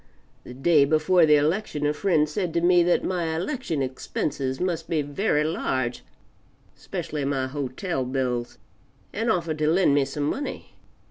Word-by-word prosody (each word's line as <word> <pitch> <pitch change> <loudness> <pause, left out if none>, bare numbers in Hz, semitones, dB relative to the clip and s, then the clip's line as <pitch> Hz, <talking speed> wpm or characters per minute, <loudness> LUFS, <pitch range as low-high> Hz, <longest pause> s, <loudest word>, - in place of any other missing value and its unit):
The 125 - -10
day 145 +2 +4
before 155 +4 +3
the 150 - +6
election 150 +1 0
a 150 - +2
friend 155 -3 +2
said 170 +2 -3
to 170 - +2
me 175 0 +5
that 175 +1 +2
my 170 -3 -1
election 175 - -2
expenses 130 +1 -3
must 180 -3 -2
be 155 -3 +1
very 150 +1 0
large 130 -6 -2 0.7
specially 150 -2 -5
my 135 -1 0
hotel 135 +3 -3
bills, 125 -2 -2 0.6
and 225 +3 -1
offered 170 -6 0
to 155 - +1
lend 175 -3 +3
me 140 -1 +3
some 145 +1 -4
money. 270 - -4
155 Hz, 155 wpm, -25 LUFS, 140-175 Hz, 0.7 s, the